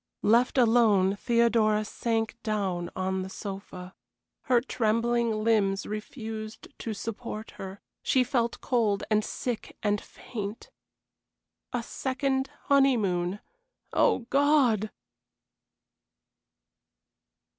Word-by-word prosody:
Left 235 +5 +4
alone 220 -6 +4
Theodora 225 -1 +2
sank 225 +1 -1
down 190 -6 -1
on 190 0 -1
the 185 - -5
sofa. 190 -2 -7 0.5
Her 250 -2 +4
trembling 235 -1 +1
limbs 200 -3 +2
refused 220 0 -6
to 220 -2 -4
support 220 0 -6
her; 195 +1 -7 0.2
she 260 - +3
felt 240 -2 -1
cold 220 -6 +1
and 215 0 +3
sick 240 0 -4
and 205 -1 +1
faint. 210 -2 -7 1.0
A 245 -1 -2
second 265 +1 -1
honeymoon. 205 -10 +2 0.5
Oh, 235 - +3
God! 270 -7 +3
220 Hz, 90 wpm, -28 LUFS, 200-240 Hz, 1.0 s, Left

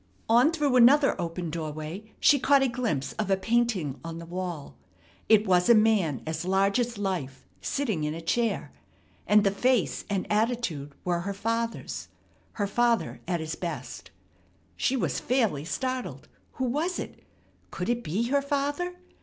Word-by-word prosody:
On 240 +6 +5
through 295 -6 +1
another 275 +4 +6
open 170 -1 -4
doorway 160 +6 -6
she 285 - +5
caught 275 +1 +4
a - - +3
glimpse 225 - -2
of 210 - -1
a 195 - +3
painting 210 - 0
on 165 0 -6
the 170 - -8
wall. 175 -4 -5 0.5
It 215 -1 +6
was 180 +1 +3
a 235 - +8
man 210 - +2
as 160 +1 -3
large 195 +4 +2
as 240 -2 -1
life, 175 -10 -3 0.2
sitting 220 - -1
in 150 +1 -2
a - - -5
chair; 230 +7 -1 0.6
and 210 0 +5
the 195 - +3
face 245 +1 +1
and 195 -2 -1
attitude 210 - -1
were 175 -1 +1
her 195 +3 -4
father's 230 +3 -3 0.5
her 205 - -1
father 235 +3 +1
at 175 -3 -1
his 160 0 -4
best. 170 -1 -6 0.7
She 270 - +1
was - - -1
fairly 220 - 0
startled. 255 +7 -3 0.3
Who 260 - -2
was 305 +9 -1
it? - - -7 0.5
Could 180 - -4
it 240 0 0
be 190 +9 -1
her 280 +1 +3
father? 290 +5 -2
210 Hz, 160 wpm, -27 LUFS, 170-245 Hz, 0.7 s, a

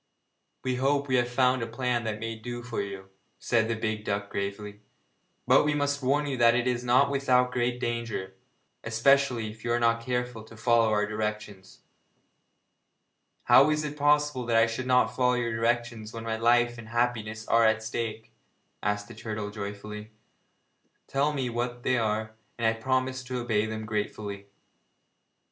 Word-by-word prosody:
'We 130 -1 -1
hope 140 +2 +1
we 130 -1 +2
have 120 0 +1
found 125 0 +2
a 115 - -2
plan 120 0 -1
that 105 -1 -3
may 115 0 -4
do 120 +2 -7
for 120 -1 -3
you,' 100 -1 -7 0.3
said 115 -2 +1
the 115 - -1
big 110 -1 -3
duck 100 -1 -3
gravely, 100 +1 -4 0.7
'but - - +5
we 150 0 +1
must 145 0 0
warn 140 +3 +1
you 140 -2 -2
that 120 -1 +5
it 125 0 +1
is 125 -1 0
not 125 +3 +4
without 125 -2 +2
great 125 0 -1
danger, 115 -6 -3 0.5
especially 120 0 +2
if 110 0 -15
you 120 - -1
are 120 - +2
not 115 0 +2
careful 125 -2 -3
to 110 0 -14
follow 115 0 +3
our 105 0 +2
directions.' 105 -2 -5 1.6
'How 140 +3 +6
is 155 0 +1
it 150 -1 -4
possible 150 -2 +2
that 115 -1 +3
I 115 - +6
should 115 +3 -4
not 125 -2 +3
follow 125 -1 +3
your 120 -2 -1
directions 115 -1 -1
when 115 -1 -6
my 115 -1 -2
life 120 +1 +2
and 110 -1 -10
happiness 110 -2 -1
are 115 0 +4
at 110 0 +3
stake?' 110 -1 -4 0.5
asked 105 0 -1
the 120 - -10
turtle 105 -2 -5
joyfully. 105 +1 -7 1.0
'Tell 140 +2 +1
me 135 -4 -2
what 120 +1 -3
they 130 -1 +2
are, 110 0 -1 0.2
and 115 - -2
I 110 - +5
will 115 - -12
promise 130 +1 0
to 130 0 -4
obey 110 -3 0
them 110 0 -5
gratefully.' 105 -1 -4
115 Hz, 175 wpm, -28 LUFS, 110-125 Hz, 1.6 s, How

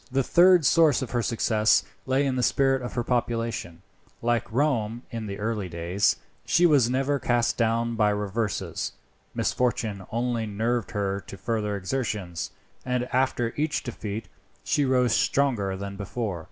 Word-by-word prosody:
The 135 +1 +2
third 175 +2 +5
source 150 -3 +4
of 125 - -6
her 120 - +1
success 110 -2 +2 0.2
lay 135 +2 +2
in 135 -2 0
the 125 - 0
spirit 135 +1 +2
of 125 - -5
her 120 - -1
population. 115 -8 -2 0.4
Like 120 -1 0
Rome 120 -3 0
in 115 -3 -4
her 100 - -4
early 105 -2 -2
days, 85 +4 +1 0.3
she 175 - +3
was 140 -8 +5
never 135 +2 +1
cast 120 -1 +1
down 115 0 +1
by 105 -2 +3
reverses. 105 +1 -2 0.4
Misfortune 110 -5 -1
only 120 -1 -1
nerved 115 +1 -1
her 100 -1 -1
to 100 - -8
further 105 -3 -2
exertions, 100 -5 -3 0.3
and 125 -1 0
after 125 -2 +1
each 150 0 -1
defeat 110 -3 -5 0.4
she 145 - +1
rose 125 -3 +3
stronger 115 -9 +1
than 100 0 -6
before. 100 -2 -3
115 Hz, 155 wpm, -26 LUFS, 105-130 Hz, 0.4 s, third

